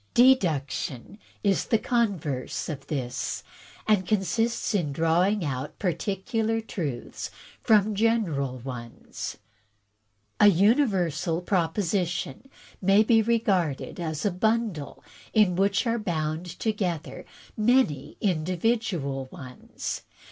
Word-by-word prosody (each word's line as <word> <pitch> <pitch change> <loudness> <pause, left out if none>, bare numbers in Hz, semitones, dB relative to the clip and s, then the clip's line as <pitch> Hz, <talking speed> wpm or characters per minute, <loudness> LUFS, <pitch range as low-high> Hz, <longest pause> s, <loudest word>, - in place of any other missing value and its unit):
" - - -41
Deduction 175 - +2 0.2
is 200 -2 +2
the 225 - +3
converse 195 - -1
of 140 -3 -6
this, 130 -5 -3 0.4
and 205 -4 +3
consists 220 +4 0
in 170 -8 0
drawing 170 +6 +2
out 140 +2 -4
particular 205 +5 -1
truths 155 - -5 0.3
from 215 -1 +4
general 195 - +1
ones. 120 -2 -7 1.0
A 210 - +8
universal 190 - +3
propo 170 -4 +1
sition 180 - -2 0.3
may 195 +3 +5
be 225 0 +4
regarded 205 - 0
as 160 -1 -3
a 205 - +3
bundle 215 -5 -1 0.3
in 210 -5 +4
which 195 +4 +2
are 235 0 +1
bound 160 -3 -2
to 220 - +1
gether 180 -7 -3 0.3
many 210 - +2
individual 175 - 0
ones. 130 -8 -6
185 Hz, 105 wpm, -26 LUFS, 155-215 Hz, 1.0 s, A